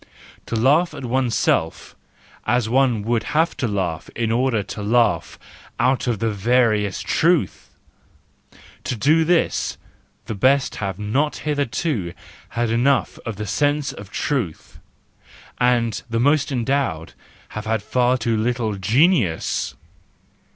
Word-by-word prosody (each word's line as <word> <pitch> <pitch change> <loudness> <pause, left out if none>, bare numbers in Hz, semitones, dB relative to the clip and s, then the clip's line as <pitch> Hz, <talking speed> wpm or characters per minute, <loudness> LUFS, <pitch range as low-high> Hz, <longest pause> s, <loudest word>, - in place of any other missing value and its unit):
To - - -3
laugh 145 +10 +3
at 130 - -6
oneself 115 -9 0 0.5
as 120 0 +2
one 125 -3 +2
would 115 +1 +1 0.2
have 165 +2 +2
to 125 - -1
laugh 95 -6 -3
in 115 -1 -1
order 120 -2 +1
to 105 - -7
laugh 110 -5 +1 0.4
out 125 +2 +1
of 120 -3 +1
the 115 +2 -1
veriest 105 -2 +1
truth 165 - +1 1.1
,—to 130 - -2
do 155 +8 +3
this 170 +1 +1 0.5
the 110 - -4
best 130 +6 +2
have 95 -3 -3
not 125 +9 0
hitherto 145 - -1 0.4
had 120 -1 +1
enough 130 +4 +1
of 115 - -3
the 105 +2 -5
sense 145 +7 0
of 100 -1 -10
truth, 120 - -3 0.8
and 120 -3 +1
the 115 0 -1
most 145 +3 +2
endowed 120 - -1 0.4
have 105 0 -6
had 110 -2 0
far 125 +2 +2
too 115 -2 0
little 110 -1 -1
genius! 115 - +1
120 Hz, 130 wpm, -21 LUFS, 105-135 Hz, 1.1 s, laugh